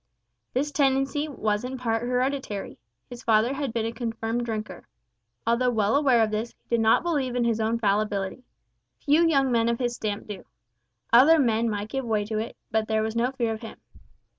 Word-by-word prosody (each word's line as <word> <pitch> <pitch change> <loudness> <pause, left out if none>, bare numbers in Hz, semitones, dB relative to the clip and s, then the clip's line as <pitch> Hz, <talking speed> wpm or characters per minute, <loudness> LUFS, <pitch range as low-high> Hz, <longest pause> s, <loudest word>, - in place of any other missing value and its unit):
This 285 +4 0
tendency 275 +1 +1
was 215 -7 -1
in 260 +1 -4
part 225 -3 -1
hereditary. 250 - -2 0.3
His 245 -1 -10
father 225 +3 +3
had 275 -3 -3
been 225 0 -1
a 225 - -2
confirmed 230 0 -3
drinker. 215 -5 -5 0.6
Although 235 +2 +2
well 220 -1 +1
aware 265 -5 +4
of 215 - -1
this, 220 +2 -3
he - - -46
did 235 - +3
not 225 +6 +4
believe 285 -8 -1
in 245 - +1
his 230 -1 +1
own 225 +1 +1
fallibility. 205 +1 -1 0.5
Few 300 +3 +3
young 275 -5 +2
men 230 -1 +2
of 235 - 0
his 240 -1 -1
stamp 210 -3 -4
do. 205 -2 -8 0.7
Other 280 +8 +7
men 230 -4 +2
might 205 0 -3
give 270 +3 -3
way 215 -3 0
to 215 0 -2
it, 225 - -5
but 220 0 0
there 220 0 +1
was 220 +1 -3
no 235 +2 +1
fear 235 -4 -1
of 220 - -8
him. 225 - -9
235 Hz, 195 wpm, -26 LUFS, 220-260 Hz, 0.7 s, Other